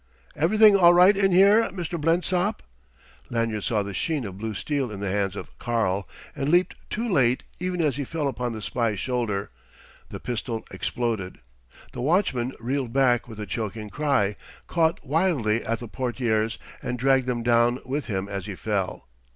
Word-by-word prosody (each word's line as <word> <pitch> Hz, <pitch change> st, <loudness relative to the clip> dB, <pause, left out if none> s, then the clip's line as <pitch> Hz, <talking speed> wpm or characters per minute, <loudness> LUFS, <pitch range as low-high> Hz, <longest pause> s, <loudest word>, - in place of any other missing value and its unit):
"Everything 210 Hz, +7 st, +5 dB
all 175 Hz, -2 st, +7 dB
right 185 Hz, +3 st, +7 dB
in 195 Hz, -1 st, +2 dB
here, 200 Hz, +5 st, +6 dB
Mr. 175 Hz, -3 st, -4 dB
Blensop?" 180 Hz, +5 st, +1 dB, 0.7 s
Lanyard 115 Hz, -3 st, -1 dB
saw 105 Hz, -3 st, 0 dB
the 100 Hz, 0 st, -6 dB
sheen 150 Hz, -, -1 dB
of 95 Hz, -3 st, -6 dB
blue 110 Hz, 0 st, -4 dB
steel 140 Hz, +2 st, -1 dB
in 105 Hz, -2 st, -7 dB
the 100 Hz, -2 st, -2 dB
hands 100 Hz, -1 st, 0 dB
of -, -, -8 dB
"Karl," 105 Hz, -5 st, 0 dB, 0.3 s
and 140 Hz, -1 st, -1 dB
leaped 175 Hz, +3 st, +3 dB, 0.2 s
too 230 Hz, +3 st, -2 dB
late: 130 Hz, -, +2 dB, 0.2 s
even 180 Hz, 0 st, -2 dB
as 145 Hz, -5 st, +1 dB
he 145 Hz, -, -1 dB
fell 150 Hz, +1 st, -2 dB
upon 125 Hz, -2 st, -2 dB
the 110 Hz, -2 st, -6 dB
spy's 115 Hz, -4 st, -1 dB
shoulders, 115 Hz, -6 st, -2 dB, 0.6 s
the -, -, -7 dB
pistol 120 Hz, -1 st, -4 dB
exploded. 115 Hz, -7 st, -3 dB, 0.5 s
The -, -, -6 dB
watchman 130 Hz, -5 st, +1 dB
reeled 125 Hz, +1 st, -2 dB
back 125 Hz, -2 st, +2 dB
with 110 Hz, -2 st, -10 dB
a 105 Hz, -, -4 dB
choking 105 Hz, +2 st, -4 dB
cry, 140 Hz, -9 st, +1 dB, 0.3 s
caught 165 Hz, -2 st, 0 dB
wildly 140 Hz, -, +1 dB
at 115 Hz, +1 st, -1 dB
the 120 Hz, -, -7 dB
portières, 115 Hz, -3 st, -1 dB, 0.2 s
and 125 Hz, -, -3 dB
dragged 130 Hz, 0 st, +2 dB
them 120 Hz, -2 st, -1 dB
down 120 Hz, +1 st, +3 dB
with 140 Hz, +2 st, -2 dB
him 95 Hz, -2 st, -2 dB
as 100 Hz, -1 st, -5 dB
he 100 Hz, -, -5 dB
fell. 100 Hz, -2 st, -3 dB
125 Hz, 175 wpm, -25 LUFS, 110-160 Hz, 0.7 s, all